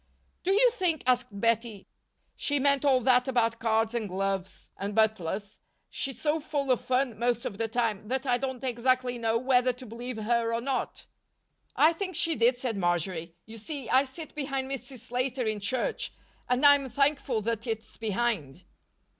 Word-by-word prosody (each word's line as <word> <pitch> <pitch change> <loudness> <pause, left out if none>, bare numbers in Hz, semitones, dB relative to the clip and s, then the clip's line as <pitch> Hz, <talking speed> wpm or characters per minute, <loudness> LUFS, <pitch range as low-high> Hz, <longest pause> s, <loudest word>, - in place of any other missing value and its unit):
"Do 375 - +1
you 475 +5 +5
think," 360 - 0
asked 250 0 +3
Bettie, 230 -2 0 0.5
"she 290 - 0
meant 280 0 +2
all 265 -3 +4
that 250 +1 +4
about 230 -3 +1
cards 225 0 +1
and 225 -4 -2
gloves 195 0 -3
and 200 +1 -4
butlers? 205 -2 0 0.3
She's 270 -3 -3
so 305 +2 +1
full 285 -3 -1
of 250 - +2
fun 255 -4 0
most 240 -1 0
of 200 - -5
the 225 - 0
time 225 -3 -1
that 260 +3 -2
I 245 -2 +2
don't 260 -1 -4
exactly 250 0 +1
know 225 0 +1
whether 255 0 +3
to 250 +1 -11
believe 240 +1 -6
her 230 +1 0
or - - 0
not." 260 +2 -3 0.7
"I 315 +2 +5
think 370 +2 -4
she 330 -1 +3
did," 240 +2 +3
said 245 -4 -2
Marjory. 175 -2 -1
"You 225 +1 -9
see, 275 +2 -5
I 265 +2 +5
sit 305 +4 -8
behind 270 -2 -3
Mrs. 265 -2 -6
Slater 250 +1 -2
in 215 -1 -1
church 255 - -1 0.4
and 250 +3 +2
I'm 285 -2 +6
thankful 275 -3 +1
that 230 +2 -2
it's 220 -1 -5
behind." 215 - -2
245 Hz, 175 wpm, -28 LUFS, 220-270 Hz, 0.7 s, I'm